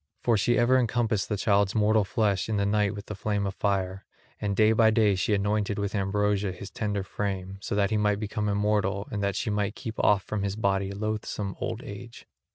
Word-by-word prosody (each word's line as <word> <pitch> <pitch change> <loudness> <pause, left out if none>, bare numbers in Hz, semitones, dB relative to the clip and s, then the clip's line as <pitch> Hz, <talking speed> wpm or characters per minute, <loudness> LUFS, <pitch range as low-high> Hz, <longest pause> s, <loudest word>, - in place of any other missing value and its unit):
For 120 - +3
she 120 +4 +2
ever 125 +2 +4
encompassed 115 -4 0
the 105 - -1
child's 100 -1 +2
mortal 110 0 +3
flesh 100 -2 0
in 110 - 0
the 100 - +1
night 105 0 +1
with 100 0 -8
the - - -6
flame 105 0 -1
of 100 - -2
fire; 95 -1 -1 0.4
and 100 -1 -1
day 110 +1 +5
by 110 0 +5
day 110 -2 +3
she 95 +3 +1
anointed 105 0 0
with 100 -1 -2
ambrosia 100 0 0
his 95 +2 -9
tender 105 -4 -2
frame, 95 -1 -4
so 100 - -3
that 100 0 +1
he 110 - +2
might 105 -1 +1
become 105 0 -2
immortal 105 -1 0
and 105 - -2
that 100 -1 0
she 105 - -1
might 105 0 -1
keep 115 -4 -5
off 100 -1 +4
from 105 -2 -3
his 100 0 -2
body 100 -2 0
loathsome 105 -1 -3
old 115 +2 -4
age. 105 +4 -9
105 Hz, 215 wpm, -27 LUFS, 100-110 Hz, 0.4 s, day